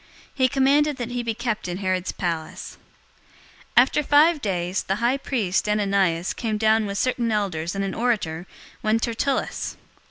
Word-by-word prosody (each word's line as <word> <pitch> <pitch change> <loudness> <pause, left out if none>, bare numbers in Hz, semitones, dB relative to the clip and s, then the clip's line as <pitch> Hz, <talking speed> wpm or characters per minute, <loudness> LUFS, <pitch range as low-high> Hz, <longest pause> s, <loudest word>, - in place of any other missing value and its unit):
He 260 -2 +3
commanded 285 +2 +2
that 245 -1 -4
he 245 0 -2
be 230 -2 -3
kept 235 -4 -3
in 175 0 -3
Herod's 185 -2 -1
palace. 165 -3 -5 1.0
024:001 - - +11
After 270 +3 0
five 300 +2 +4
days, 185 -2 -1
the 195 - -1
high 240 +5 +1
priest, 210 -8 -1
Ananias, 195 -4 +1
came 220 -3 -2
down 220 0 +3
with 200 0 -4
certain 240 0 0
elders 185 -5 -1
and 195 - -1
an 195 - -3
orator, 205 -8 -1 0.3
one 215 +1 +2
Tertullus. 240 +4 -2
215 Hz, 160 wpm, -24 LUFS, 190-245 Hz, 1.0 s, 024:001